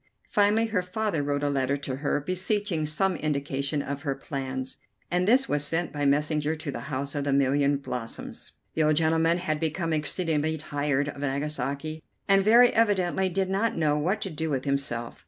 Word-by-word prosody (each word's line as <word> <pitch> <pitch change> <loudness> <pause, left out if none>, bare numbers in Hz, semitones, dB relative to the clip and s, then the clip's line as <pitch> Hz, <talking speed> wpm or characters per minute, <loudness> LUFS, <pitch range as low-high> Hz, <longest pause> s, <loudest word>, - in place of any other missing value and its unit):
Finally 210 +2 +3
her 215 -5 0
father 180 -2 -1
wrote 145 0 -1
a 145 - +2
letter 135 0 +1
to 135 -2 -4
her, 145 +1 0
beseeching 185 +1 -1
some 185 +5 +1
indication 140 -1 -1
of 140 0 -4
her 140 -3 -2
plans, 130 -1 -5 0.3
and 180 +1 +1
this 260 +4 +4
was 145 0 0
sent 165 +3 -1
by 145 -1 0
messenger 150 +2 +1
to 155 -2 -5
the 140 - -7
House 140 0 -3
of 145 - -2
the 140 - 0
Million 140 +1 +3
Blossoms. 125 -4 -6 0.2
The 160 - 0
old 155 0 +4
gentleman 165 +1 +3
had 155 -4 -2
become 165 +1 -1
exceedingly 160 0 0
tired 145 -1 -1
of 140 - -8
Nagasaki, 145 +2 -2 0.3
and 195 -1 +5
very 235 +4 +7
evidently 190 -4 +2
did 190 +1 -1
not 215 +4 0
know 150 -2 +2
what 180 +8 0
to 195 - -3
do 160 +1 -3
with 135 -3 -1
himself. 140 -4 -2
150 Hz, 185 wpm, -27 LUFS, 140-180 Hz, 0.3 s, very